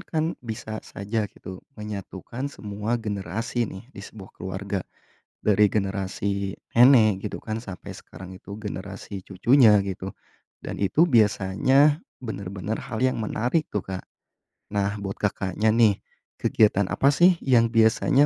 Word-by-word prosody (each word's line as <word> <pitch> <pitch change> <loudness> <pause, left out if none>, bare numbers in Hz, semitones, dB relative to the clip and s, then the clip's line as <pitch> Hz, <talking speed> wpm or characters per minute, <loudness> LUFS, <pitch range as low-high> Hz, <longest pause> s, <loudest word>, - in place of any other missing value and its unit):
kan 160 -4 -2 0.2
bisa 110 -2 -6
saja 105 +1 -3
gitu 95 -1 -10 0.2
menyatukan 105 +4 -6
semua 105 -2 -3
generasi, 110 +2 -3
nih, 95 +3 -9
di - - -10
sebuah 100 -1 -11
keluarga, 95 +1 -4 0.6
dari 105 0 +5
generasi 100 0 -2 0.2
nenek, 110 -5 +5
gitu - - -6
kan, 110 0 -3
sampai 95 -5 -8
sekarang 95 0 -11
itu 100 +2 -9
generasi 100 -1 -6
cucunya, 105 +5 +5
gitu, 95 -1 -5 0.5
dan - - -5
itu 100 - +4
biasanya 125 - +3 0.2
benar-benar 100 -1 -4
hal 115 +2 -1
yang 130 -3 +1
menarik 120 +8 0
tuh, 105 - -3
Kak. 95 -1 -5 0.7
Nah, 100 0 0
buat 100 -1 -5
Kakaknya, 105 +1 0
nih, 110 -4 +4 0.4
kegiatan 105 -2 +3
apa 140 +1 +3
sih 175 +2 +5
yang 115 -3 +4
biasanya 115 +5 +4
105 Hz, 130 wpm, -25 LUFS, 100-115 Hz, 0.7 s, dari